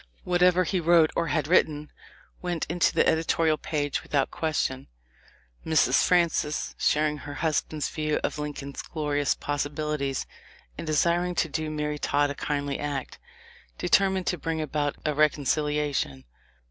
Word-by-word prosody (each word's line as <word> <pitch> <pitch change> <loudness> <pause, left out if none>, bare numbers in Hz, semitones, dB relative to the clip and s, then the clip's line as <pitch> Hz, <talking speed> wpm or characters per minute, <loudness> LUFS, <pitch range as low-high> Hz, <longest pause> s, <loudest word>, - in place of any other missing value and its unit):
Whatever 180 0 +3
he 185 +1 -1
wrote 165 -1 +4
or 170 - 0
had 155 -4 0
written, 150 -3 +2 0.5
went 175 -3 -2
into 170 +2 +2
the - - +2
editorial 160 -1 +2
page 145 -2 -2
without 140 -2 0
question. 150 -5 -2 0.8
Mrs. 160 -1 +3
Francis, 170 -4 +1
sharing 150 0 +2
her 145 0 -8
husband's 155 -1 -1
views 155 -1 -1
of - - -2
Lincoln's 145 -2 -5
glorious 145 -3 -1
possibilities, 145 -1 -2 0.5
and - - -7
desiring 170 +4 +1
to 165 - +1
do 155 +1 -3
Mary 150 -1 -3
Todd 145 0 +1
a - - -3
kindly 145 -1 -2
act, 145 -2 -4 0.6
determined 190 -1 +2
to 180 - -1
bring 165 +1 -2
about 150 -1 -1
a 150 - +1
reconcilia 150 0 +1
tion. 65 - -3
150 Hz, 140 wpm, -26 LUFS, 145-165 Hz, 0.8 s, wrote